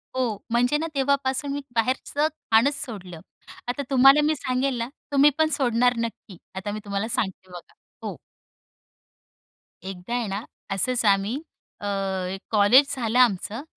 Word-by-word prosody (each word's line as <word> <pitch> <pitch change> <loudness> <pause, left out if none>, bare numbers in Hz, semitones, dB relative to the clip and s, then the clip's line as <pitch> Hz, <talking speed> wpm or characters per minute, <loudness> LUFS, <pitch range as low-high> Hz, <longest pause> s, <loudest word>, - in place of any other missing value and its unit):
हो, 245 -5 0
म्हणजे 245 +5 +2
ना, 320 +2 -2
तेव्हापासून 275 0 0
मी 285 - -3
बाहेरचं 260 +5 0 0.2
खाणचं 225 +6 +5
सोडलं. 185 - -7 0.5
आता 245 +3 -2
तुम्हाला 270 +2 +6
मी 310 +1 +2
सांगेल 260 -1 -1
ना, 230 0 -2 0.2
तुम्ही 285 +1 +6
पण 315 0 +3
सोडणार 245 -2 +2
नक्की. 230 -4 -5 0.2
आता 190 +2 -4
मी 215 - -4
तुम्हाला 200 +2 -2
सांगते 190 -5 -3
बघा 175 -1 -11 0.3
हो. - - -5 1.7
एकदा 190 +4 -6
आहे 245 -2 -1
ना, 200 +3 -4 0.3
असंच 240 +5 +1
आम्ही 200 +7 +2 0.4
अ, - - -4 0.4
एक 190 0 -5
कॉलेज 235 +7 +5
झालं 240 -2 -1
आमचं. 225 -1 +2
240 Hz, 145 wpm, -24 LUFS, 205-270 Hz, 1.7 s, तुम्हाला